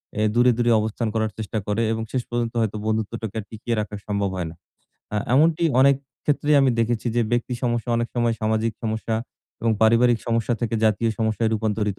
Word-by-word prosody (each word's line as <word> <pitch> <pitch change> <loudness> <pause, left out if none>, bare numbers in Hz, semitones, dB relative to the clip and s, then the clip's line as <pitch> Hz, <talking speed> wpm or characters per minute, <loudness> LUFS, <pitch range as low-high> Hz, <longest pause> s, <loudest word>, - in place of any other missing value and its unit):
অ্যা 105 - +1
দূরে, 125 +1 +5
দূরে 120 -1 +2
অবস্থান 110 +2 -2
করার 110 -1 0
চেষ্টা 110 0 -4
করে 105 +2 0
এবং 110 0 -2
শেষ 130 -2 -1
পর্যন্ত 120 -1 -2
হয়তো 110 -1 -1
বন্ধুত্বটাকে 110 0 -2
আর - - -5
টিকিয়ে 115 +1 -3
রাখা 105 0 -4
সম্ভব 100 -1 0
হয় 90 -3 -3
না। 80 - -11 0.6
আ - - +1 0.2
এমনটি 160 +4 +4 0.2
অনেক 140 +1 +6 0.3
ক্ষেত্রেই 145 0 +2
আমি 135 -1 +4
দেখেছি 115 0 0
যে - - +4
ব্যক্তি 120 +1 0
সমস্যা 120 -1 -1
অনেক 120 0 -1
সময় 120 -1 +1
সামাজিক 110 +1 0
সমস্যা 110 0 -2 0.5
এবং 115 - +1
পারিবারিক 115 +1 +5
সমস্যা 115 +1 +1
থেকে 115 -2 -1
জাতীয় 110 +1 +2
সমস্যায় 110 0 +1
রূপান্তরিত 105 -2 -1
115 Hz, 190 wpm, -23 LUFS, 110-120 Hz, 0.6 s, অনেক